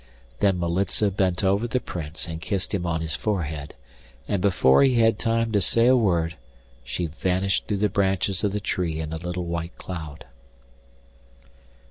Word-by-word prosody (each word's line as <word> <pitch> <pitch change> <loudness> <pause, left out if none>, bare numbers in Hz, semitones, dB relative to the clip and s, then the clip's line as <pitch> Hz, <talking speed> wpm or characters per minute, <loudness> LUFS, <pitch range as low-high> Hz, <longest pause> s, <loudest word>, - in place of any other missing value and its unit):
Then 100 -3 +3
Militza 95 +4 +1
bent 95 -1 0
over 100 +4 +2
the 125 +2 0
Prince 80 -5 -5
and 80 -1 -6
kissed 95 +5 -2
him 90 -3 -1
on 80 -1 -1
his 80 -1 -2
forehead, 80 -8 -3 0.5
and 100 - 0
before 90 -9 +4
he 135 -2 +4
had 115 -2 +3
time 115 0 0
to 105 -2 +2
say 115 +6 +3
a 130 +1 +6
word 85 -8 +1 0.5
she 85 +7 -3
vanished 95 +4 -1
through 105 - 0
the - - +5
branches 95 0 0
of 105 - +1
the 105 - -2
tree 85 -5 -2
in 80 0 -4
a - - -3
little 90 +1 -4
white 85 0 -4
cloud. 80 -5 -7
90 Hz, 170 wpm, -24 LUFS, 85-100 Hz, 0.5 s, a